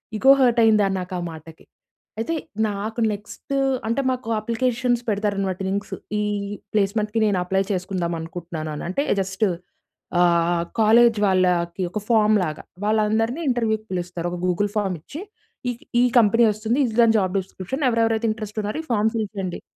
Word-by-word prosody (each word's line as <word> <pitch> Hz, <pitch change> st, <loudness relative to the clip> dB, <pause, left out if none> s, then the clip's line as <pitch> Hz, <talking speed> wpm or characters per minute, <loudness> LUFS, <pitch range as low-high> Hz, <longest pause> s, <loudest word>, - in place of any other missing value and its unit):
Ego 265 Hz, +5 st, +6 dB
hurt 240 Hz, -2 st, +4 dB
అయిందా 215 Hz, -3 st, +4 dB
నాకా 180 Hz, 0 st, -5 dB
ఆ -, -, -4 dB
మాటకి. 160 Hz, 0 st, -13 dB, 0.5 s
అయితే 230 Hz, +9 st, -1 dB, 0.3 s
నాకు 210 Hz, +3 st, -4 dB
నెక్స్ట్ 210 Hz, +6 st, -8 dB, 0.3 s
అంటే 230 Hz, +5 st, +1 dB
మాకు 255 Hz, -2 st, -4 dB
అప్లికేషన్స్ 240 Hz, +2 st, 0 dB
పెడతారు 205 Hz, 0 st, 0 dB
అన్నమాట 190 Hz, -1 st, -2 dB
లింక్స్. 200 Hz, +1 st, -3 dB, 0.2 s
ఈ -, -, +1 dB, 0.5 s
ప్లేస్మెంట్‌కి 210 Hz, +1 st, +1 dB
నేను 205 Hz, -3 st, +2 dB
అప్లై 190 Hz, +2 st, +1 dB
చేసుకుందాం 180 Hz, -2 st, -2 dB
అనుకుంటున్నాను 165 Hz, -1 st, -6 dB
అని. -, -, -6 dB
అంటే 280 Hz, +10 st, 0 dB, 0.2 s
జస్ట్ 195 Hz, +2 st, -3 dB, 0.8 s
ఆహ్, 170 Hz, -1 st, +3 dB, 0.2 s
కాలేజ్ 230 Hz, +1 st, +5 dB
వాళ్ళకి 180 Hz, -1 st, +1 dB
ఒక 210 Hz, -, -3 dB
ఫార్మ్ 215 Hz, -2 st, +4 dB
లాగా 155 Hz, -3 st, -4 dB, 0.2 s
వాళ్ళందరిని 220 Hz, +6 st, +1 dB
ఇంటర్‌వ్యూ‌కి 220 Hz, -3 st, 0 dB
పిలుస్తారు. 175 Hz, -1 st, -3 dB
ఒక 175 Hz, -, -5 dB
గూగుల్ 185 Hz, +3 st, +1 dB
ఫార్మ్ 195 Hz, -4 st, 0 dB
ఇచ్చి 295 Hz, -, -8 dB, 0.5 s
ఈ -, -, +1 dB, 0.3 s
ఈ -, -, +5 dB, 0.2 s
కంపెనీ 230 Hz, +1 st, +4 dB
వస్తుంది. 215 Hz, +4 st, -1 dB
ఇది 225 Hz, -3 st, -4 dB
దాని 225 Hz, -1 st, +5 dB
జాబ్ 185 Hz, -1 st, -1 dB
డిస్క్రిప్షన్ 190 Hz, +8 st, -5 dB
ఎవరెవరైతే 225 Hz, -1 st, +1 dB
ఇంట్రెస్ట్ 215 Hz, -1 st, -5 dB
ఉన్నారో 210 Hz, +8 st, -3 dB
ఈ -, -, -16 dB
ఫార్మ్ 220 Hz, 0 st, +2 dB
ఫిల్ 215 Hz, -2 st, -1 dB
చేయండి. 185 Hz, -3 st, -4 dB
210 Hz, 160 wpm, -23 LUFS, 185-225 Hz, 0.8 s, Ego